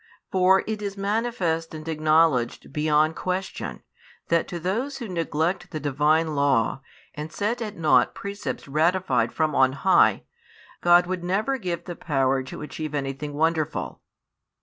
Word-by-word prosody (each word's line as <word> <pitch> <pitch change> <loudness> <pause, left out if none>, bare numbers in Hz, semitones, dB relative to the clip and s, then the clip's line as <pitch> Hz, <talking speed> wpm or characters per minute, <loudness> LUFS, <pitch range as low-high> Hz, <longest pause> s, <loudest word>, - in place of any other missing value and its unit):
For 190 0 +4
it 215 -1 -4
is 200 -1 -4
manifest 195 -6 -1
and 155 +1 -9
acknowledged 155 -6 +2
beyond 155 +1 +2
question, 185 +1 -4 0.5
that 170 -1 +2
to 175 - -5
those 225 - -2
who 240 - -6
neglect 165 0 -1
the 155 - -5
Divine 150 +3 +1
law, 135 -3 +1 0.3
and 150 +1 -6
set 230 +7 -2
at 215 -2 -5
nought 155 -2 +3
precepts 200 -5 -5
ratified 170 +6 +1
from 155 -1 0
on 130 0 +4
high, 140 - +3 0.6
God 175 0 +6
would 180 -1 -3
never 215 +9 0
give 180 -5 -3
the 175 - -6
power 135 -4 +1
to 130 +3 -8
achieve 155 0 -6
|29 - - -2
anything 140 +1 -3
wonderful. 160 0 -1
165 Hz, 150 wpm, -25 LUFS, 150-190 Hz, 0.6 s, God